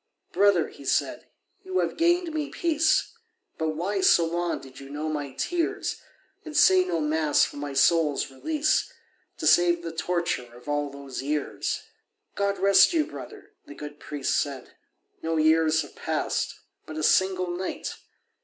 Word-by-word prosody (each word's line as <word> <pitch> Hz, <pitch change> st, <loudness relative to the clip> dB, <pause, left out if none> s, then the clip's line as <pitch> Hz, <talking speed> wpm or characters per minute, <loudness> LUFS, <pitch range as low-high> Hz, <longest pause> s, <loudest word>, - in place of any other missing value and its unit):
"Brother," 200 Hz, -5 st, +3 dB
he -, -, -14 dB
said, -, -, -1 dB, 0.4 s
"you 375 Hz, 0 st, -3 dB
have -, -, 0 dB
gained 345 Hz, 0 st, +2 dB
me 300 Hz, -2 st, -2 dB
peace, 325 Hz, -2 st, +1 dB, 0.5 s
But 160 Hz, -1 st, -1 dB
why 195 Hz, +5 st, -1 dB
so 170 Hz, -2 st, +5 dB
long 170 Hz, +1 st, -2 dB
did 130 Hz, -1 st, -13 dB
you 135 Hz, 0 st, -11 dB
know 150 Hz, +2 st, -4 dB
my 145 Hz, -3 st, -4 dB
tears, 340 Hz, -, -2 dB, 0.4 s
And 310 Hz, -2 st, -5 dB
say 185 Hz, -1 st, +6 dB
no 175 Hz, -2 st, -2 dB
Mass 155 Hz, -1 st, +2 dB
for -, -, -9 dB
my 145 Hz, -1 st, -5 dB
soul's 150 Hz, -1 st, +2 dB
release, 305 Hz, -, 0 dB, 0.5 s
To -, -, -5 dB
save 175 Hz, -1 st, +4 dB
the 165 Hz, -, -4 dB
torture 160 Hz, -7 st, -2 dB
of 120 Hz, +2 st, -16 dB
all 145 Hz, 0 st, -1 dB
those 140 Hz, -2 st, -7 dB
years?" 145 Hz, +1 st, -2 dB, 0.5 s
"God 200 Hz, 0 st, 0 dB
rest 200 Hz, -, +5 dB
you, 315 Hz, -3 st, +2 dB
brother," 415 Hz, +3 st, -10 dB, 0.2 s
the 145 Hz, -, -10 dB
good 150 Hz, 0 st, -9 dB
priest 145 Hz, -3 st, -2 dB
said, 140 Hz, -2 st, -3 dB, 0.5 s
"No 165 Hz, 0 st, -1 dB
years 160 Hz, 0 st, +3 dB
have -, -, -13 dB
passed—but 155 Hz, -, -4 dB
a 155 Hz, -, -3 dB
single 185 Hz, 0 st, +2 dB
night." 185 Hz, +1 st, -4 dB
165 Hz, 155 wpm, -26 LUFS, 145-200 Hz, 0.5 s, say